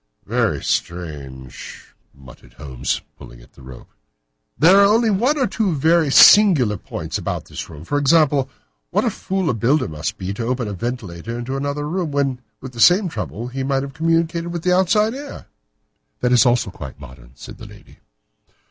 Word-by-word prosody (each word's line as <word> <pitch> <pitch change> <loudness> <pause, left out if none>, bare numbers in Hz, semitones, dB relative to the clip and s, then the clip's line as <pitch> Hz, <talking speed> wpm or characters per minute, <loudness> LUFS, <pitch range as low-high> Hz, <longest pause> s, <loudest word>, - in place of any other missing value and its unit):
"Very - - -1
strange!" 70 -7 -6 0.2
muttered 60 -3 -17
Holmes, 65 -3 -4 0.2
pulling - - -13
at - - -20
the - - -18
rope. 65 -1 -13 0.7
"There 180 +5 +6
are 205 +3 +5
one 250 +10 +1
or 265 - +2
two 200 -4 -1
very 160 +2 +2
singular 145 - +6
points - - -6
about - - -4
this - - -8
room. 80 0 -11
For 145 +9 -1
example, 145 -2 +3 0.4
what - - 0
a - - +1
fool 190 -2 -3
a 135 - +1
builder 125 +7 +1
must 80 0 -5
be 95 +1 -5
to 115 - -5
open 125 -1 -2
a 105 - -5
ventilator 115 -1 -5
into 120 +3 -5
another 145 +1 -3
room, 170 -1 -3
when, 135 -3 -1 0.2
with 130 - -8
the 120 - -12
same 180 - +5
trouble, 115 - -6
he 135 +2 -5
might 135 0 -1
have 140 -1 -8
communicated 165 +2 0
with 170 -1 -5
the 180 0 +2
outside 210 +4 +2
air!" 280 +2 -9 0.8
"That 125 - +1
is 125 -1 +5
also 120 -5 +1
quite 70 -4 -10
modern," 65 -3 -14
said - - -12
the - - -10
lady. - - -17
135 Hz, 180 wpm, -20 LUFS, -, 0.8 s, There